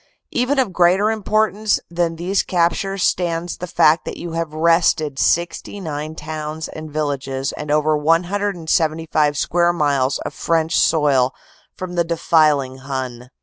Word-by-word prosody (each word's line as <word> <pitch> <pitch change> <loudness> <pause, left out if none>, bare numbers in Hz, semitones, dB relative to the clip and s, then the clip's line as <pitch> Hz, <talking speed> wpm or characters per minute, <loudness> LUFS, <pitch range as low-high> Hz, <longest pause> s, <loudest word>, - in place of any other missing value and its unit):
"Even 250 +4 0
of 250 -8 +1
greater 185 +5 +3
importance 215 0 +1
than 170 -1 -1
these 180 +4 0
captures 180 +2 0
stands 170 -1 -1
the 180 - -6
fact 160 -1 +3
that - - -6
you 170 - -6
have 165 -1 -3
wrested 155 -3 +2
69 160 -3 -1
towns 155 0 -5
and 155 0 -8
villages 140 -3 -2
and 150 - -7
over 150 +1 +2
175 165 -2 0
square 175 +3 +2
miles 140 -5 +1
of - - -4
French 165 0 0
soil 135 -5 +3 0.4
from 185 -1 -6
the 175 -1 +1
defiling 155 -5 +2
Hun. 130 -2 -6
165 Hz, 135 wpm, -20 LUFS, 150-175 Hz, 0.4 s, greater